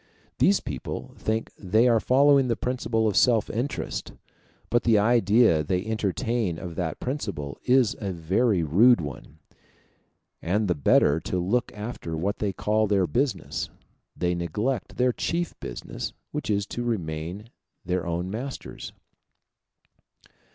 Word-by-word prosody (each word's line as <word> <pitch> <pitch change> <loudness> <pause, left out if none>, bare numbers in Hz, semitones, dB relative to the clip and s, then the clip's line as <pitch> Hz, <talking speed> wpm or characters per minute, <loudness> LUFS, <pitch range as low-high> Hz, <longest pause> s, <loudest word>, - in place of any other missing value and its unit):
These 195 +1 +4
people - - -6
think 110 +1 -2
they 110 +5 +3
are 115 -2 +4
following 135 +2 +4
the 115 - +1
principle 120 -3 -1
of 105 - 0
self 115 -4 +3
interest, 125 +6 -3 0.6
but 120 - +3
the 115 -2 +4
idea 110 -4 +4
they 90 +5 -1
entertain 110 -2 -1
of 90 -1 -6
that 80 -2 -3
principle 80 - -4
is 125 -3 +4
a 100 -3 -3
very 95 +3 +1
rude 105 - +5
one; 75 0 -7 1.0
and 105 +5 0
the 90 - +2
better 75 0 +3
to 90 - -3
look 100 +8 0
after 105 -7 -5
what 100 +5 -2
they 105 -2 0
call 105 +3 +1
their 100 -2 +2
business, 120 -1 -1 0.5
they 90 0 0
neglect 105 - -2
their 125 0 +3
chief 170 +5 -2
business, - - -6 0.2
which - - -4
is 100 -1 +1
to 120 - -5
remain 95 -1 -4 0.3
their 90 0 -1
own 85 +2 -2
masters. 130 +6 -6
105 Hz, 135 wpm, -26 LUFS, 90-120 Hz, 1.0 s, rude